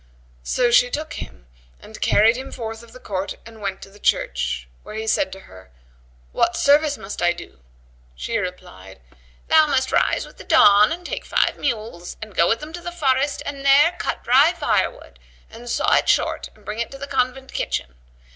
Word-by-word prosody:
So 240 - +1
she 245 +1 +5
took 305 +3 -4
him - - -9 0.3
and - - -13
carried 225 +3 +4
him 260 +2 -7
forth 225 -1 -6
of 235 -1 -16
the 255 - -13
court 195 -3 -4
and 225 -1 -13
went 195 -1 -4
to - - -12
the 205 - -17
church, 60 - -1
where - - -10
he 220 0 -4
said 280 +6 +1
to 195 - -9
her, 95 - -15 0.6
"What - - +1
service 290 +1 +3
must 195 +1 -7
I 175 0 +3
do?" 175 - -12 0.6
She 225 - -2
replied, 95 - -8 0.5
"Thou 315 -1 +5
must 265 -2 0
rise - - +2
with - - -17
the - - -9
dawn 205 +3 +6
and 350 +2 -5
take - - -4
five - - +1
mules 215 -9 -4
and 215 -2 -9
go 170 - +3
with 230 - +1
them 305 +1 -8
to 350 - -7
the 350 - -6
forest 280 -4 0
and 280 -1 -6
there 285 +5 +5
cut - - -3
dry 275 +7 +5
fire 340 - +1
wood - - -17 0.3
and 235 +2 -10
saw - - +1
it - - +3
short - - +1
and 210 - -22
bring 210 +3 -5
it 235 - -2
to 275 - -10
the 280 - -6
convent 265 -1 -2
kitchen. 60 -1 -3
235 Hz, 205 wpm, -22 LUFS, 195-280 Hz, 0.6 s, dawn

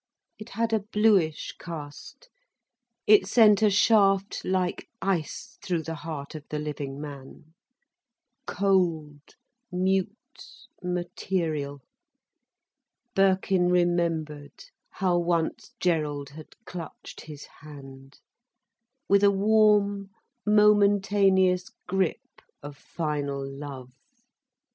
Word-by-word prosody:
It 215 +2 -10
had 230 0 0
a 220 - +3
bluish 205 -6 +1
cast. 165 - -9 0.8
It 205 -3 +5
sent 215 -1 +5
a 215 - +5
shaft 200 -1 +3
like 185 -1 -1
ice 185 -7 -3
through 175 -3 -2
the 165 - -5
heart 155 -2 -7
of 155 -2 -8
the 150 - -3
living 145 -2 -5
man. 145 +1 -10 0.9
Cold, 170 -7 0 0.5
mute, 190 +1 +1 0.7
material! 175 -5 -3 1.3
Birkin 190 -2 +2
remembered 165 -4 -1 0.3
how 180 -2 0
once 170 -1 -1
Gerald 150 -5 -1
had 155 +1 -13
clutched 170 -3 -9
his 150 -2 -10
hand, 135 -2 -13 0.9
with 200 +1 +4
a 200 - +7
warm, 205 -1 +3 0.4
momentaneous 200 -3 +3 0.2
grip 190 -2 -2 0.2
of 145 0 -8
final 145 -3 -4
love. 135 -2 -8
175 Hz, 90 wpm, -26 LUFS, 150-195 Hz, 1.3 s, a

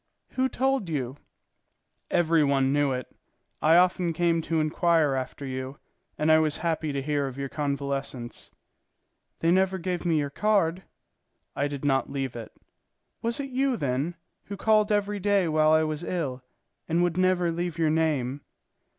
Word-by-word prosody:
"Who 260 0 0
told 265 -8 0
you?" 135 -3 -3 0.9
"Every 165 -2 +3
one 135 -1 +2
knew 145 -1 +2
it; 125 -1 -5 0.5
I 160 +2 +5
often 180 -1 +3
came 170 0 +1
to 160 0 -1
inquire 155 -1 +2
after 130 +1 -4
you, 130 +1 -5 0.4
and 155 +1 +2
I 160 - +7
was 155 -2 +1
happy 160 -2 0
to 140 -1 -3
hear 145 -1 0
of 135 0 -8
your 140 -1 -4
convalescence." 140 -4 -4 0.9
"They 165 - +3
never 190 +1 +2
gave 180 -1 -3
me 170 -3 +2
your 145 -2 -1
card." 190 -1 +1 0.7
"I 145 - 0
did 145 0 -6
not 135 -1 +1
leave 135 -3 -3
it." 115 -2 -7 0.7
"Was 235 +3 -1
it 275 -1 -4
you, 265 -1 +1
then, 140 +3 -1 0.3
who 200 - -7
called 215 0 +3
every 205 0 0
day 200 -2 +2
while 155 0 +3
I 155 0 +4
was 155 +1 -3
ill, 145 -9 -3 0.5
and 170 +2 +2
would 175 -2 0
never 185 -2 +2
leave 170 0 -3
your 160 -2 +2
name?" 145 -4 0
160 Hz, 165 wpm, -26 LUFS, 140-180 Hz, 0.9 s, I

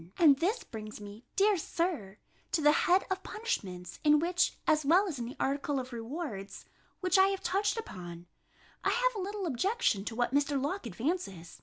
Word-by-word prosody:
And 290 -5 +6
this 410 +9 0
brings 215 -1 -8
me, 205 +3 -10
dear 405 0 +4
Sir, 310 - -2 0.4
to 320 - +2
the 295 - +7
head 360 +5 +3
of 380 0 -1
punishments, 190 - -4
in 300 0 +6
which, 350 +3 +1
as 305 0 +3
well 355 +8 +4
as 305 -8 -4
in 235 - -3
the 250 +4 -7
article 280 +1 0
of 255 -1 -7
rewards, 230 - -6 0.4
which 370 +1 +3
I 380 - +7
have 390 -1 -2
touched 410 +3 +1
upon, 175 - -7 0.6
I - - +2
have - - +2
a 420 - -4
little 405 0 -4
objection 330 - +1
to 225 - -4
what 245 +1 0
Mr. 285 0 +2
Locke 290 +2 -2
advances. 205 - -4
295 Hz, 185 wpm, -31 LUFS, 230-380 Hz, 0.6 s, the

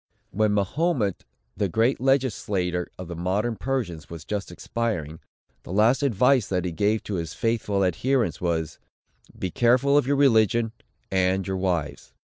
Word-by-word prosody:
When 110 +2 +1
Mahomet, 105 - 0 0.3
the 100 - -1
great 115 +7 +1
legislator 105 -10 0
of 90 - -7
the 85 - -6
modern 100 +7 -1
Persians, 110 - -3
was 80 -2 -9
just 100 -3 -4
expiring, 85 -6 -3 0.4
the - - -10
last 110 +7 +3
advice 125 -1 +3
that 90 -1 -1
he 90 - -2
gave 105 +5 0
to 100 - -3
his 80 -1 -7
faithful 105 -3 0
adherents, 115 - 0
was, 80 -3 -2 0.6
"Be 90 - -4
watchful 130 +4 +5
of 130 - -2
your 140 - +2
religion, 115 -4 +3 0.4
and 95 0 +1
your 95 -1 -2
wives." 85 -6 -2
105 Hz, 150 wpm, -25 LUFS, 90-120 Hz, 0.6 s, watchful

